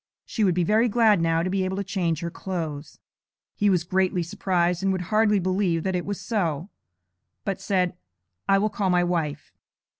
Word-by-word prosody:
She 220 - -2
would 185 -4 +3
be 180 - +2
very 220 +6 +3
glad 215 -4 +4
now 165 0 +2
to 185 - -1
be 195 -1 0
able 185 +1 -2
to 200 - -1
change 180 -4 -1
her 170 0 -3
clothes.' 160 -6 -5 0.6
He 205 - +2
was 180 -4 +2
greatly 185 0 +1
surprised, 175 0 0
and 195 0 +1
would 185 +1 -3
hardly 215 -1 +4
believe 185 -3 0
that 190 -1 -1
it 180 - -3
was 205 -1 -3
so; 175 - -2 0.7
but 195 -1 -2
said, 185 -3 +1 0.6
'I 195 - +6
will 210 +2 +1
call 200 -2 -1
my 180 -1 +3
wife.' 160 -4 -2
185 Hz, 190 wpm, -25 LUFS, 170-200 Hz, 0.7 s, I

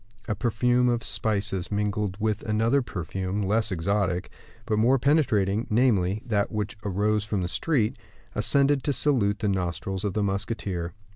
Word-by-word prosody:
A 110 - 0
perfume 120 +2 +2
of 120 0 0
spices, 100 -3 -1
mingled 105 -1 -1
with 110 -1 0
another 115 +5 +2
perfume 95 -1 -3
less 110 +2 +1
exotic, 95 +1 -1 0.3
but 110 -2 0
more 125 +5 +4
penetrating, 115 -7 +2
namely, 105 -4 +2
that 105 -4 0
which 105 -2 -3
arose 105 +2 +1
from 105 -3 -2
the - - -1
street, 115 - 0 0.4
ascended 140 -1 +2
to 145 - +1
salute 115 -7 +2
the 105 - -2
nostrils 95 0 -2
of 100 -3 -1
the 105 - +1
musketeer. 100 -3 -2
105 Hz, 150 wpm, -26 LUFS, 95-115 Hz, 0.4 s, more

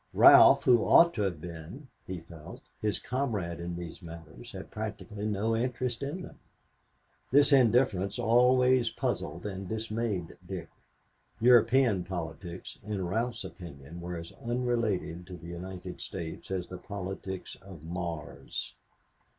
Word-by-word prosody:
Ralph, - - +9
who 120 -2 +6
ought 170 0 +6
to 105 - -2
have 95 -6 -1
been, 85 - -9 0.2
he 90 -3 -5
felt, 80 -2 -11 0.2
his 105 -2 0
comrade 110 -11 -2
in 85 0 -4
these 85 -1 -7
matters, 80 -6 -10
had - - -9
practically 105 -1 -5
no 110 +2 0
interest 120 0 -1
in 150 +7 -4
them. - - -11 0.9
This 145 +2 +6
indifference 115 -6 +3
always 125 +1 +4
puzzled 85 -5 -3
and 95 -2 -5
dismayed 110 -5 -3
Dick. - - -6 0.7
European 120 -3 +5
politics, 85 0 -6
in 100 -3 -3
Ralph's 115 +5 -1
opinion, 85 -2 -9
were 90 0 -5
as 85 0 -8
unrelated 115 -8 -1
to 90 -2 -8
the 85 0 -10
United 90 +1 -7
States 85 -5 -6
as 95 -2 -2
the 90 - -7
politics 95 -1 -6
of 95 -6 -12
Mars. 85 -1 -5
95 Hz, 135 wpm, -30 LUFS, 85-120 Hz, 0.9 s, Ralph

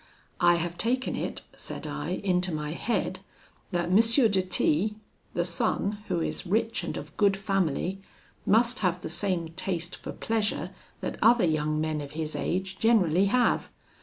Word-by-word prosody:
'I 175 0 +5
have 170 0 -3
taken 255 +3 0
it,' - - -4
said - - -7
I, - - -3
'into 180 -1 +2
my 150 -1 -3
head, 225 +8 -1 0.5
that 175 -2 -1
M. 185 - +5
de 225 -3 +4
T, 185 +2 +1 0.4
the 175 - +1
son, 200 +4 0
who 170 - 0
is - - -3
rich 225 +4 0
and - - -3
of 150 +1 -8
good 200 -2 +4
family, 195 -2 -1 0.4
must 235 +4 +3
have 180 -3 0
the - - -3
same 175 -2 -1
taste 175 0 -3
for - - -7
pleasure 210 -6 -1 0.3
that - - -4
other 230 -3 +6
young 155 -1 +1
men 155 -1 -1
of 145 0 -8
his 155 0 -3
age 190 +1 -2
generally 195 -6 +4
have. 245 +5 +2
185 Hz, 165 wpm, -28 LUFS, 165-210 Hz, 0.5 s, other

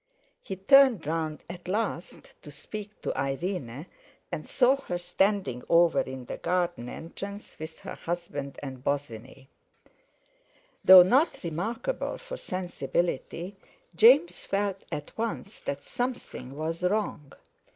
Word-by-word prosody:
He 190 - -5
turned 250 - +6
round 155 0 -2
at 175 0 -9
last 195 -3 -3
to - - -11
speak 210 +8 -8
to - - -2
Irene, 135 0 -3 0.5
and - - -5
saw 265 +1 +4
her 180 -10 -4
standing 185 - 0
over 170 0 +5
in 130 -1 -4
the - - -5
garden 175 -9 -1
entrance, 200 +5 -8
with 160 +1 -8
her - - -6
husband 155 -5 -5
and 130 -2 -7
Bosinney. 135 -2 -4 1.4
Though 185 -1 +11
not 265 - +2
remarkable 225 - -2
for - - -8
sensibility, 180 - -3 0.4
James 260 - +6
felt 195 -1 -1
at 145 - -5
once 225 -2 -3
that 140 0 -4
something 245 - -4
was 165 +2 -3
wrong. 180 -7 -1
175 Hz, 120 wpm, -28 LUFS, 145-205 Hz, 1.4 s, Though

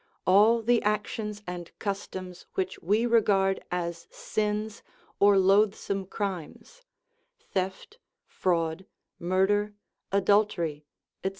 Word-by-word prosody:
All 215 +5 +5
the 240 +1 +3
actions 210 0 -2
and 175 -1 -6
customs 185 -3 -5
which 190 0 -2
we 210 +7 +2
regard 200 -5 +2
as 170 -1 -3
sins 210 0 -3 0.4
or 200 0 +6
loathsome 195 0 +2
crimes 195 - -5 0.6
(theft, 190 - -4 0.3
fraud, 170 0 -1 0.3
murder, 195 +4 +1 0.4
adultery, 190 -7 +1 0.4
etc.) 190 - +1
195 Hz, 95 wpm, -28 LUFS, 185-210 Hz, 0.6 s, or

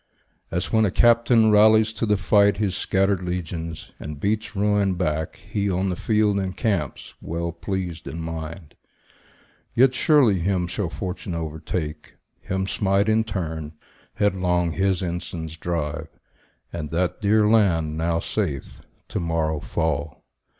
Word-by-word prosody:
As 90 +6 -3
when 110 0 +4
a 105 - +3
captain 115 +1 +4
rallies 110 +1 +5
to 115 +1 -2
the 105 -1 +3
fight 100 +2 +4
His 100 -3 0
scattered 95 0 +1
legions, 85 -2 -5
and 75 -1 -7
beats 110 +5 -1
ruin 100 -1 +2
back, 80 -3 -1
He, 100 -1 -3
on 95 +1 0
the - - -2
field, 105 0 +1
encamps, 95 - -2
well 85 +1 -3
pleased 90 -1 -4
in 80 - -5
mind. 80 0 -6 1.0
Yet 130 +1 +5
surely 130 - +4
him 90 0 0
shall 90 +1 -3
fortune 90 -1 -5
overtake, 80 -1 -5 0.2
Him 95 0 -2
smite 100 +1 +1
in 110 +1 +3
turn, 80 -7 -4 0.4
headlong 90 -4 +1
his 95 +1 0
ensigns 85 -2 -4
drive; 80 -3 -3 0.7
And 75 -3 -4
that 85 +5 -1
dear 105 +1 +4
land, 85 -8 +3
now 85 +1 0
safe, 85 -11 -3 0.3
to - - -2
morrow 80 -2 -1
fall. 80 -2 -2
90 Hz, 135 wpm, -24 LUFS, 80-105 Hz, 1.0 s, rallies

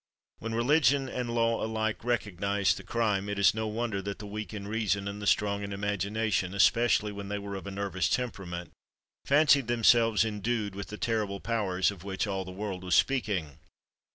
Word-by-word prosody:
When 115 0 -4
religion 140 +2 +3
and 125 -2 -3
law 115 0 +1
alike 110 0 -2
recognised 100 -4 0
the - - -9
crime, 105 -4 0
it 100 - -3
is 100 - +5
no 110 0 -2
wonder 110 -2 -2
that 100 +1 -5
the 105 - -8
weak 105 +1 -6
in 100 -2 -6
reason 100 -2 -1
and 100 +1 -5
the 105 - -3
strong 100 0 +2
in 100 0 -5
imagination, 100 0 -1
especially 105 0 +3
when 100 -1 -7
they 105 +1 -3
were 100 0 -6
of 95 0 -6
a - - -5
nervous 100 -2 -1
temperament, 90 -8 -3 0.5
fancied 140 -3 +4
themselves 115 -2 +4
endued 105 -1 -2
with 100 0 -6
the 105 - -7
terrible 105 -4 -1
powers 100 -5 0
of 95 -4 -11
which 95 +1 -2
all 95 -2 -2
the 90 - -9
world 95 -1 -5
was 90 -2 +1
speaking. 100 - 0
105 Hz, 185 wpm, -29 LUFS, 100-115 Hz, 0.5 s, is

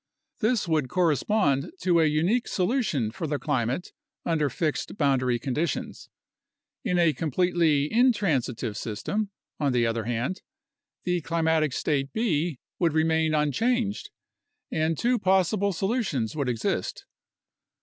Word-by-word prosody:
This 225 -3 +1
would 155 -6 +1
correspond 170 - +1
to 175 -2 +3
a 160 - +4
unique 170 +11 +1
solution 180 - 0
for 155 +8 -4
the 145 0 -1
climate 135 +1 -1 0.3
under 155 -4 +1
fixed 155 +6 -2
boundary 130 -4 +2
conditions. 140 +6 -3 0.7
In 180 - 0
a 170 -3 +4
completely 165 -2 +2
intransitive 155 - +1
system, 195 - -3 0.3
on 140 -3 +1
the 120 -1 +3
other 115 -1 -1
hand, 120 - -2 0.6
the 180 -1 0
climatic 160 -2 +1
state 140 +1 -1
B 170 - 0 0.2
would 170 -4 +2
remain 160 0 +2
unchanged, 205 - 0 0.6
and 160 0 0
two 245 0 +1
possible 190 +1 +2
solutions 190 - -1
would 140 -4 -1
exist. 115 -2 -2
160 Hz, 120 wpm, -26 LUFS, 140-185 Hz, 0.7 s, a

